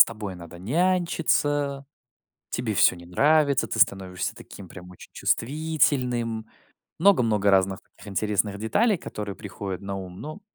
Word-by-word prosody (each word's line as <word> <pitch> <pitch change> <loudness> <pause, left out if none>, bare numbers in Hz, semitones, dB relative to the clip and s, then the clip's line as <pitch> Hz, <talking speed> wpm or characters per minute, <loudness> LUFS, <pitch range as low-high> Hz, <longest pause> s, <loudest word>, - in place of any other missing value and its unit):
с - - +1
тобой 105 -3 -6
надо 85 -1 -11
нянчиться. 145 - +1 0.7
Тебе 110 -3 -2
всё 90 - +5
не 85 0 -12
нравится. 140 - +3
Ты - - -3
становишься 95 -2 +1
таким 95 -2 -12
прям 90 +1 -11
очень 90 - -14
чувствительным. 125 -5 0 0.5
Много-много 115 - +4
разных 95 0 +2
таких - - -16
интересных 100 0 -1
деталей, 205 - +2
которые 105 - -6
приходят 95 -1 -6
на 100 0 -5
ум, 95 -1 -8
но 155 +7 -7
110 Hz, 135 wpm, -25 LUFS, 95-145 Hz, 0.7 s, всё